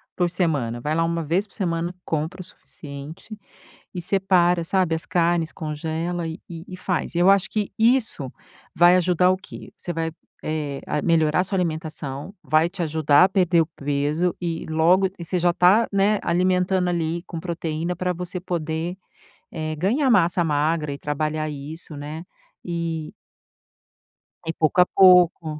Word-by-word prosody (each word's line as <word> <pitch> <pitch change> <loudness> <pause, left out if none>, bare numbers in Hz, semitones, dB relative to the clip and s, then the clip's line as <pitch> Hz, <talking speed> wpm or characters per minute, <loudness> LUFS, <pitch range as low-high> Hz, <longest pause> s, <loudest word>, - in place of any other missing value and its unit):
por 175 -1 +1
semana, 140 -10 -1
vai 150 +5 -2
lá 165 - +2
1 165 0 -1
vez 175 +7 0
por 200 - -20
semana, 170 -3 -2
compra 160 +4 -3
o - - -7
suficiente 155 +5 -11 0.6
e 175 - -4
separa, 180 -2 +2
sabe, 180 -1 +1
as 160 - -4
carnes, 170 -2 +1
congela 160 +2 -3
e 160 +3 -5
e 175 +2 -9
faz. 180 -2 -2
E - - 0
eu 180 +3 +6
acho 195 0 +3
que 210 -2 -2
isso 225 - +2 0.4
vai 175 +2 +6
ajudar 180 0 +3
o 185 - +2
quê? 190 - -12
Você 175 - -8
vai, 165 0 -2 0.3
eh, 150 -3 -3
a 150 - -1
melhorar 165 +2 +2
sua 195 +1 -3
alimentação, 155 -1 -4
vai 155 +2 +3
te 180 -1 -5
ajudar 155 +1 +4
a - - +4
perder 180 -3 +3
o - - -4
peso 145 +4 -1
e 165 -2 -4
logo 170 +5 +3
e 170 - -6
você 180 +2 -1
já 175 0 +3
tá, 190 +6 +4
né, 200 +1 +2
alimentando 180 +1 +1
ali 170 0 -1
com 165 -2 -6
proteína 170 0 -3
para 180 0 -1
você 180 +1 -5
poder, 170 0 -3 0.5
eh, 155 -1 -4
ganhar 245 - +1
massa 175 -4 +3
magra 150 -1 0
e 140 - -6
trabalhar 155 +1 -2
isso, 150 +3 -8
né, 150 +4 -7 0.4
e 165 -2 -4 1.3
E 165 - -1
pouco 155 +2 +1
a - - +6 0.2
pouco, 180 -3 +6
170 Hz, 165 wpm, -23 LUFS, 155-180 Hz, 1.3 s, eu